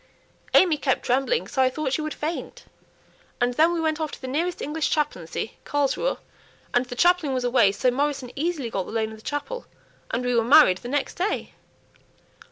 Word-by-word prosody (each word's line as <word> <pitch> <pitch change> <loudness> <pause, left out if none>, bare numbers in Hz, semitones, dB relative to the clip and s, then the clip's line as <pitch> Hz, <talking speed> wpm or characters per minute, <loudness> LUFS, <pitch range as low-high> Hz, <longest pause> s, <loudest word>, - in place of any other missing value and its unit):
AimÄe 330 -5 +5
kept 265 -3 +1
trembling 270 - +1
so 265 - 0
I 260 - +4
thought 275 0 -3
she 310 - 0
would 310 0 -4
faint; 315 +3 -5 0.7
and 245 0 +1
then 320 +6 +4
we 345 - -1
went 315 -1 0
off 310 - -1
to - - -8
the 260 - -7
nearest 335 +7 -1
English 300 +2 -2
chaplaincy, 220 - -2
Carlsruhe, 290 - 0 0.6
and 245 +1 +2
the 245 - -6
chaplain 345 -2 +3
was 255 - -1
away, 245 -5 +4
so 245 +6 +1
Morrison 275 -1 -1
easily 290 -5 -2
got 190 -4 -2
the - - -7
loan 220 -1 -1
of 220 - -10
the - - -16
chapel, 390 - -4 0.4
and 245 +2 -2
we 245 - +1
were 230 -1 +3
married 240 -7 +6
the 240 - -8
next 285 +1 -1
day." 380 +4 -2
275 Hz, 195 wpm, -24 LUFS, 245-315 Hz, 0.7 s, married